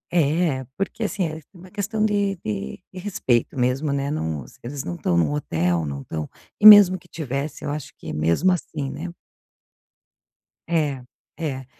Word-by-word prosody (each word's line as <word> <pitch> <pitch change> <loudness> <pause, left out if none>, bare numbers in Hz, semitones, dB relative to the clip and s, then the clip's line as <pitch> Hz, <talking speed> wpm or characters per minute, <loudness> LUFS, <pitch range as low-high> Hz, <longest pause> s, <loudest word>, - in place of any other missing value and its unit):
é, 155 -3 +2
porque 195 +3 -3
assim, 205 -3 -1
é 155 0 -7
uma 185 0 -14
questão 210 +1 -2
de 200 -2 +1
de 100 -11 -4
de 185 - -8
respeito 135 - 0
mesmo, 130 +4 +1
né, 140 0 -1
não 80 - -2
os - - -15
eles 135 +3 -5
não 85 0 -4
estão 85 - 0
num 85 - +2
hotel, 85 - 0
não 70 -1 -5
estão 75 +2 -5 0.3
e 210 - +1
mesmo 205 -3 +11
que - - -22
estivesse, 145 -1 -4
eu - - -2
acho 150 -2 -6
que - - -7
mesmo 85 - +2
assim, 155 -5 -3
né. 165 +5 -6 1.5
É, 150 -6 0 0.4
é. 135 -5 -4
145 Hz, 170 wpm, -23 LUFS, 120-180 Hz, 1.5 s, mesmo